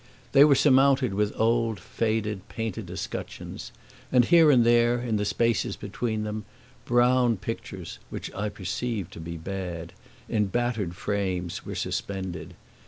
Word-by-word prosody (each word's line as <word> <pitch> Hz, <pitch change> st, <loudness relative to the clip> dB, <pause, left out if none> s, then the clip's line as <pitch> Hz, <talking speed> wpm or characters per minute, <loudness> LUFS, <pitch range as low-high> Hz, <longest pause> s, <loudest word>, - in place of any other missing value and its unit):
They 140 Hz, -, +8 dB
were 145 Hz, -2 st, +6 dB
surmounted 135 Hz, -4 st, +4 dB
with 105 Hz, +1 st, +1 dB
old 115 Hz, -1 st, +2 dB
faded 110 Hz, -3 st, -2 dB
painted 110 Hz, 0 st, -4 dB
escutcheons, -, -, -6 dB, 0.4 s
and 125 Hz, -2 st, +5 dB
here 165 Hz, 0 st, +6 dB
and 125 Hz, -5 st, +5 dB
there, 120 Hz, +1 st, +4 dB
in 120 Hz, -3 st, -1 dB
the 105 Hz, -, -1 dB
spaces 115 Hz, +2 st, +1 dB
between 110 Hz, +1 st, -3 dB
them, 105 Hz, 0 st, -4 dB, 0.4 s
brown 120 Hz, -1 st, +3 dB
pictures, 110 Hz, +4 st, -6 dB
which -, -, -6 dB
I 105 Hz, +1 st, -2 dB
perceived 105 Hz, 0 st, -4 dB
to -, -, -9 dB
be 85 Hz, +1 st, -6 dB
bad, 85 Hz, -1 st, -5 dB, 0.3 s
in 105 Hz, -2 st, +1 dB
battered 115 Hz, -5 st, -1 dB
frames, 95 Hz, -3 st, -2 dB
were -, -, -4 dB
suspended. 95 Hz, -3 st, -4 dB
110 Hz, 140 wpm, -27 LUFS, 95-120 Hz, 0.4 s, They